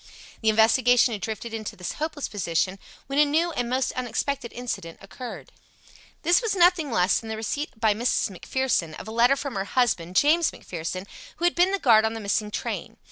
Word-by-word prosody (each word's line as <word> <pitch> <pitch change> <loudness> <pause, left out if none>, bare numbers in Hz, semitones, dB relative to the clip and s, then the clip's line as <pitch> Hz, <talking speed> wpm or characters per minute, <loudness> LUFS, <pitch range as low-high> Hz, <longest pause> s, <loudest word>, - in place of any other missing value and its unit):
The 220 - +3
investigation 240 +3 +4
had 205 - -5
drifted 225 +2 -5
into 220 -2 -5
this 180 -1 -5
hopeless 305 -1 -4
position 185 -1 -1 0.3
when 275 +2 -1
a - - +8
new 320 +4 +1
and 245 -6 -2
most 255 +1 0
unexpected 255 +1 -3
incident 230 -9 -5
occurred. 245 +5 -9 0.7
This 345 +6 +4
was 450 -4 -1
nothing 350 -4 +4
less 185 -5 +2
than 225 - -9
the 220 - -3
receipt 225 +3 -4
by 220 -2 +3
Mrs. 230 -1 0
McPherson 185 -5 -1
of - - -9
a - - -6
letter 240 +4 +4
from 280 -1 -5
her 195 -2 -2
husband, 195 -7 0
James 315 - +4
McPherson, 180 +2 -6 0.3
who 345 - -2
had 350 - +3
been 360 +2 +3
the 395 - +1
guard 225 - +5
on 220 0 0
the - - -4
missing 210 0 -1
train. - - -5
235 Hz, 195 wpm, -25 LUFS, 210-285 Hz, 0.7 s, a